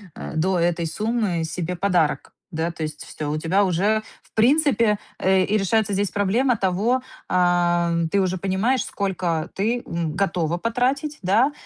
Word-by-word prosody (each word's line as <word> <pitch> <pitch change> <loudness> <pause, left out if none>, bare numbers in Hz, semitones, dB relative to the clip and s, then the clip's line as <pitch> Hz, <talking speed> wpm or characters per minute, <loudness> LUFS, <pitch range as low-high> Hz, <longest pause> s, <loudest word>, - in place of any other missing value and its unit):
э, - - -7
до 180 +3 +1
этой 170 0 +1
суммы 210 -1 -1
себе 175 +2 -3
подарок, 175 -4 0 0.2
да. 165 +1 -2
То 165 -1 -6
есть 155 0 -5
всё, 150 -1 -5
у 150 - -1
тебя 175 +6 +2
уже 200 +5 +1 0.2
в - - -28
принципе, 235 -3 +3 0.2
э, 190 0 +3
и 210 +3 +1
решается 210 +1 +1
здесь 200 0 0
проблема 230 +6 +1
того, 205 +6 +1 0.3
ам, 175 -2 +2
ты 200 +4 +2
уже 185 0 0
понимаешь, 195 +8 0
сколько 175 -5 -2
ты, 230 +5 -1
м, 170 -2 -3
готова 175 -4 0
потратить, 260 - -1
да, 220 +10 +3
190 Hz, 160 wpm, -23 LUFS, 170-220 Hz, 0.3 s, принципе